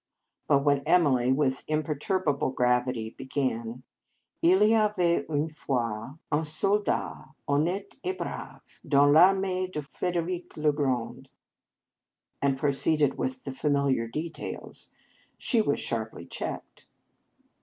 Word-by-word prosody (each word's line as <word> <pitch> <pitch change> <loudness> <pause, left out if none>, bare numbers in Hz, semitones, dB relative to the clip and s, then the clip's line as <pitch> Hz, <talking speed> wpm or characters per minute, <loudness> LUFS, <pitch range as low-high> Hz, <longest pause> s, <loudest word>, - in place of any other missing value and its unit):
But 140 0 +3
when 140 -1 +3
Emily 140 -8 +3
with 130 -1 +1
im 155 0 0
perturbable 150 -2 -1
gravity 125 -2 +1
began 125 -3 -3 0.3
:" - - -47
II 175 +2 +6 0.2
y - - +5
avait 175 -4 0
une 150 0 0
fois 130 -4 -3
un 150 +1 +1
soldat, 195 +1 0
honnete 175 +8 -1
et 370 0 -2
brave, - - -8
dans 145 0 +4
Parmee 185 +2 +4
de 150 -4 -4
Frederic 175 +4 -4
le 150 0 +2
Grand," 130 -5 -2 1.1
and 135 -1 +1
proceeded 145 +1 +2
with 260 0 -3
the - - -5
familiar 140 -3 0
de 155 +8 -3
tails, 160 - -8 0.5
she 235 -4 +2
was 145 -9 0
sharply 110 -1 -3
checked. - - -6
145 Hz, 125 wpm, -27 LUFS, 130-170 Hz, 1.1 s, II